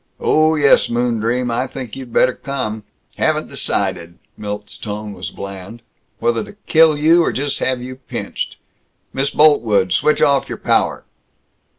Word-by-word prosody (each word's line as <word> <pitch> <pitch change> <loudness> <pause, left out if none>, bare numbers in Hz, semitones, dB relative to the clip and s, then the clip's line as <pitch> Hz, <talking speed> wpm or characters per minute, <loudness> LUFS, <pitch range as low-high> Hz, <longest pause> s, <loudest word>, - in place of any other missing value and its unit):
Oh, 155 +1 +3
yes, 145 -2 +4
moondream, 120 +1 0
I 125 +3 -1
think 125 -3 -7
you 130 -1 -8
better 125 +2 +2
come. 120 -7 -4 0.3
Haven't - - 0
decided" 85 -1 -2 0.2
Milt's 105 0 -6
tone 105 -1 -5
was - - -6
bland 100 +4 -9 0.3
"whether 115 0 0
to - - -12
kill 160 -2 +5
you 165 +4 +5
or - - +1
just 140 +2 -2
have 130 -1 -1
you 130 0 -8
pinched. 130 - -5 0.6
Miss 135 +1 0
Boltwood! 110 -12 +3
Switch 150 +10 +2
off 140 -1 +2
your - - -4
power!" - - +1
125 Hz, 150 wpm, -18 LUFS, 105-140 Hz, 0.6 s, kill